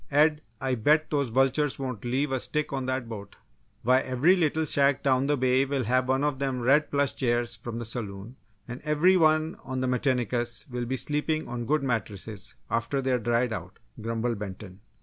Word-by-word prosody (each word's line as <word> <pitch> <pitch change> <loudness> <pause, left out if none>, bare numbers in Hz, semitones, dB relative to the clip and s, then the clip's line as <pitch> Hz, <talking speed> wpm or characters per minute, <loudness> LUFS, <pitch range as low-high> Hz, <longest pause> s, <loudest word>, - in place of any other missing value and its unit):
"Ed, 150 +1 +3 0.2
I 130 +1 -1
bet 150 +7 +2
those 140 -4 +1
vultures 135 +4 +2
won't 130 -6 -5
leave 130 +4 0
a 130 - 0
stick 150 +3 -1
on 135 -2 -2
that 130 -2 -2
boat 105 -3 -8 0.5
why, 130 +2 +5
every 135 +9 +3
little 160 -2 +1
shack 140 -2 +2
down 135 -1 +2
the 145 0 +2
bay 130 +1 +3
will 135 -1 -1
have 130 +3 +1
one 130 +1 +2
of 145 -3 0
them 135 -2 -1
red 140 +5 +3
plush 140 -1 0
chairs 120 -1 0
from 115 +2 -7
the 115 - -4
saloon, 110 0 -5 0.3
and 125 +1 -7
every 150 +5 +4
one 155 -1 +3
on 130 -1 -4
Metinicus 125 -2 0
will 120 0 -3
be 130 +2 -2
sleepin' 150 +4 -1
on 120 -1 -5
good 150 +1 +1
mattresses 110 -5 -4
after 115 +4 -1
they're 130 -2 +1
dried 120 +1 +1
out," 90 -3 -7 0.2
grumbled 115 0 -2
Benton. 95 -2 -8
130 Hz, 190 wpm, -27 LUFS, 120-145 Hz, 0.5 s, why